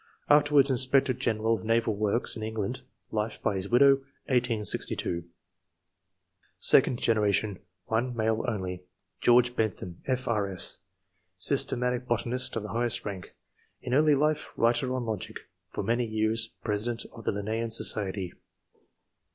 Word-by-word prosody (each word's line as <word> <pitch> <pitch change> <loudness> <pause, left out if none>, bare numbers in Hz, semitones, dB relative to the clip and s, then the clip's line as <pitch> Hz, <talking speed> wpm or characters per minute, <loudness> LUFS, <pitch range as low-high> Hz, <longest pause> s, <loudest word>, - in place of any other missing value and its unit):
Afterwards 145 -2 +5
inspector 130 +1 +3
general 115 -3 -1
of 110 - -3
naval 115 0 +1
works 105 +3 -1
in - - -7
England 110 +3 -4 0.3
(life 105 0 -3
by - - -1
his 95 0 -4
widow, 135 +3 +5 0.3
1862). 115 -8 0 1.3
Second 125 - +5
generation. 105 -3 0
— - - -53
1 120 +2 -1
male 110 0 0
only: 90 -4 -4 0.2
— 95 - -47
George 125 0 +4
Bentham, 95 -6 -3
F.K.S., 110 -8 +2 0.6
systematic 125 0 +2
botanist 120 +2 -2
of 115 - -3
the 105 - -7
highest 120 0 -1
rank; 95 -4 -7 0.5
in 125 - -4
early 150 +1 +4
life, 150 +2 -1
writer 120 +2 +1
on 125 -2 -3
logic; 110 -2 -5 0.3
for - - -5
many 120 +1 0
years 110 +1 -1 0.2
President 115 +2 -2
of 115 - -11
the - - +1
Linnsean 110 +3 -3
Society. 95 -4 +1
115 Hz, 135 wpm, -27 LUFS, 105-125 Hz, 1.3 s, Afterwards